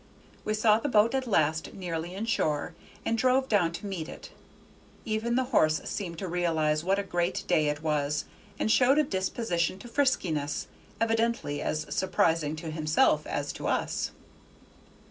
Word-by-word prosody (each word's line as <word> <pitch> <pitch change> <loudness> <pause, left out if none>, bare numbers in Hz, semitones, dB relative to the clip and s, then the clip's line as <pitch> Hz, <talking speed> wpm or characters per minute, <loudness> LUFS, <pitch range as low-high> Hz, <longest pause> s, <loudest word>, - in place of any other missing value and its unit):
We 215 - -1
saw 215 0 +4
the 290 - -2
boat 220 0 +4
at 265 -1 -1
last 160 -6 +1
nearly 175 -1 -4
in 210 +3 -3
shore, 160 -7 0 0.3
and 230 - +1
drove 255 +3 +2
down 200 -8 +2
to 190 - -7
meet 180 -5 -4
it: - - -10 0.7
even 220 +2 -1
the 260 - +3
horse 155 -6 +4
seemed 175 -5 -4
to 190 - -4
realize 160 -3 +1
what 190 +2 +2
a 200 - 0
great 175 -2 -1
day 155 -1 +3
it 150 +1 -2
was, 150 -1 0 0.3
and 220 - +1
showed 260 +4 +5
a 305 - +5
disposition 190 - -1
to 240 - -11
friskiness, 185 - 0 0.3
evidently 225 -9 0
as 155 0 -2
surprising 165 -4 +1
to 160 0 -6
himself 155 +9 +2
as - - -2
to - - -5
us. - - -1
185 Hz, 165 wpm, -28 LUFS, 155-225 Hz, 0.7 s, showed